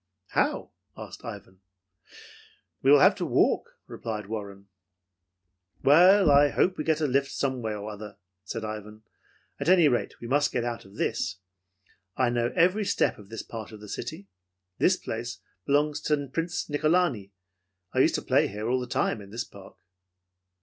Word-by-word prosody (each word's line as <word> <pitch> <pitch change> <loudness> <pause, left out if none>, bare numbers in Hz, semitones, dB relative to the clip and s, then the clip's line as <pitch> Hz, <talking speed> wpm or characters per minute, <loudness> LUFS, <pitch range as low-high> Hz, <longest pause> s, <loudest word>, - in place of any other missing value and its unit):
"How?" - - 0 0.3
asked - - -9
Ivan. 95 0 -9 1.2
"We 135 - +2
will 145 -1 +7
have - - +7
to - - -3
walk," - - +1
replied 105 -2 -5
Warren. 100 -2 -7 1.2
"Well, 180 +4 +6
I 145 +1 +6
hope 180 - +2
we 170 -4 -5
can 160 - +3
get 155 - -7
a - - +2
lift 140 0 +1
someway 125 -6 -2
or 105 0 -6
other," 105 0 -9 0.3
said 110 +3 -5
Ivan. 105 0 -7 0.6
"At - - -1
any 180 -4 +6
rate, 125 -4 -1
we - - -9
must 145 +3 +2
get 120 - -1
out 120 -3 -4
of 95 - -16
this. - - -2 0.8
I 125 -2 +2
know 120 0 0
every 185 +5 +3
step 195 - 0
of 100 -1 -14
this 115 -1 -6
part 110 -2 -8
of 110 - -10
the 105 - -11
city. 100 0 -6 0.5
This 185 +1 +4
place 120 +1 -5 0.3
belongs 145 +1 +2
to 145 -3 0
Prince 165 +1 -2
Nicholani. 155 - +1 0.6
I - - +1
used - - +4
to - - -2
play 105 - +1
all 120 +4 0
the 125 - -5
time 115 -2 -1
in 100 - -12
this 115 +4 -4
park." - - -15
120 Hz, 170 wpm, -27 LUFS, 105-150 Hz, 1.2 s, will